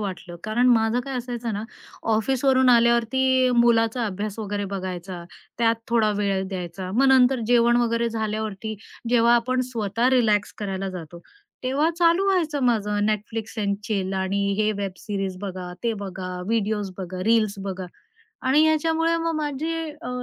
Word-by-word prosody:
वाटलं. 180 Hz, -4 st, -6 dB
कारण 225 Hz, +4 st, +1 dB
माझं 225 Hz, 0 st, +3 dB
काय 270 Hz, +1 st, -6 dB
असायचं 240 Hz, -2 st, -4 dB
ना, 205 Hz, +1 st, -3 dB, 0.5 s
ऑफिसवरून 260 Hz, +3 st, +2 dB
आल्यावरती 250 Hz, +2 st, +3 dB
मुलाचा 235 Hz, 0 st, +3 dB
अभ्यास 205 Hz, +2 st, -4 dB
वगैरे 205 Hz, -1 st, -3 dB
बघायचा. 185 Hz, -2 st, -5 dB, 0.3 s
त्यात 230 Hz, -1 st, +3 dB
थोडा 225 Hz, -2 st, +3 dB
वेळ 200 Hz, -2 st, 0 dB
द्यायचा. 185 Hz, 0 st, -5 dB
मग 270 Hz, +4 st, +4 dB
नंतर 260 Hz, -1 st, +5 dB
जेवण 240 Hz, 0 st, +4 dB
वगैरे 235 Hz, -1 st, +1 dB
झाल्यावरती, 220 Hz, -1 st, -3 dB, 0.3 s
जेव्हा 235 Hz, 0 st, +4 dB
आपण 255 Hz, +2 st, +1 dB
स्वतः 230 Hz, +1 st, 0 dB
रिलॅक्स 215 Hz, -5 st, +2 dB
करायला 195 Hz, -2 st, -3 dB
जातो, 170 Hz, -1 st, -9 dB, 0.4 s
तेव्हा 280 Hz, +6 st, +1 dB
चालू 340 Hz, +3 st, +4 dB
व्हायचं 315 Hz, -6 st, 0 dB
माझं, 210 Hz, -3 st, +1 dB
Netflix 215 Hz, +1 st, -3 dB
एंड 200 Hz, -1 st, 0 dB
चिल 195 Hz, -3 st, -2 dB
आणि 195 Hz, +1 st, 0 dB
हे 215 Hz, 0 st, +2 dB
वेब 200 Hz, -2 st, -3 dB
सीरीज 195 Hz, -3 st, -4 dB
बघा, 185 Hz, -3 st, -6 dB
ते 230 Hz, -1 st, +1 dB
बघा, 185 Hz, -3 st, -6 dB
व्हिडिओज 210 Hz, -3 st, -1 dB
बघा, 185 Hz, 0 st, -5 dB
रील्स 220 Hz, -2 st, +3 dB
बघा. 190 Hz, -1 st, -4 dB, 0.6 s
आणि 290 Hz, +4 st, +5 dB
ह्याच्यामुळे 325 Hz, +1 st, +2 dB
मग 330 Hz, 0 st, -1 dB
माझे 305 Hz, +2 st, -2 dB, 0.3 s
अ, 250 Hz, -, -5 dB
225 Hz, 150 wpm, -24 LUFS, 200-250 Hz, 0.6 s, नंतर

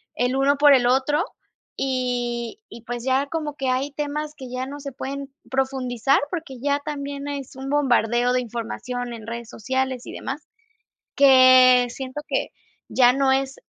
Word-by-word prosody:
el 250 Hz, +2 st, 0 dB
uno 275 Hz, +1 st, +3 dB
por 290 Hz, 0 st, +7 dB
el 245 Hz, -3 st, +4 dB
otro, 270 Hz, +5 st, +2 dB, 0.5 s
y 245 Hz, -, -2 dB
y, 230 Hz, 0 st, -11 dB
pues, 240 Hz, 0 st, -5 dB
ya 265 Hz, +1 st, +2 dB
como 300 Hz, -1 st, -4 dB
que 270 Hz, -2 st, -3 dB
hay 260 Hz, +3 st, 0 dB
temas 295 Hz, +1 st, -4 dB
que 265 Hz, -, -8 dB
ya 255 Hz, +1 st, -3 dB
no 285 Hz, +1 st, -7 dB
se 280 Hz, -1 st, -6 dB
pueden 275 Hz, +2 st, -6 dB, 0.2 s
profundizar, 265 Hz, -1 st, +1 dB
porque 315 Hz, -7 st, -5 dB
ya 285 Hz, +1 st, +1 dB
también 285 Hz, -1 st, -5 dB
es 280 Hz, -3 st, -6 dB
un 265 Hz, +1 st, -6 dB
bombardeo 245 Hz, -4 st, +2 dB
de 255 Hz, -, +2 dB
información 245 Hz, +1 st, -5 dB
en 225 Hz, -2 st, -9 dB
redes 235 Hz, 0 st, -6 dB
sociales 260 Hz, +2 st, -2 dB
y -, -, -8 dB
demás, 280 Hz, +3 st, -6 dB, 0.7 s
que 255 Hz, -2 st, +7 dB
siento 260 Hz, +3 st, -6 dB
que -, -, -1 dB, 0.4 s
ya 250 Hz, -1 st, +5 dB
no 270 Hz, 0 st, +2 dB
es 270 Hz, 0 st, 0 dB
265 Hz, 165 wpm, -23 LUFS, 245-280 Hz, 0.7 s, por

